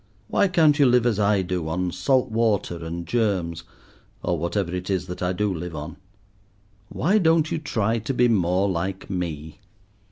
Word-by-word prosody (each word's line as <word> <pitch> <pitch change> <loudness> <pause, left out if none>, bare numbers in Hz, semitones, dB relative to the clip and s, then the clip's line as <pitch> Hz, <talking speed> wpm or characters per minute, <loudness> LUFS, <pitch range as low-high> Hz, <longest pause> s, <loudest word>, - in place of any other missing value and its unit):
Why 200 - +3
can't 160 -5 +3
you 140 - +6
live 125 -1 +3
as 115 -4 +1
I 100 -1 +2
do 90 -3 -3
on 90 +2 -1
salt 110 +9 +1
water 105 -7 0
and 85 +1 -5
germs, 90 -8 -1 0.6
or 90 - 0
whatever 85 +2 -2
it 90 +1 -4
is 95 -2 0
that 90 - -7
I 90 0 0
do 100 +2 -1
live 85 -1 -6
on? 75 +2 -6 0.9
Why 190 +10 +2
don't 160 -3 +3
you 165 - -1
try 115 -6 -1
to 110 +5 -3
be 125 0 +4
more 95 -3 +2
like 95 +2 -3
me?" 80 -4 -4
95 Hz, 180 wpm, -24 LUFS, 85-115 Hz, 0.9 s, you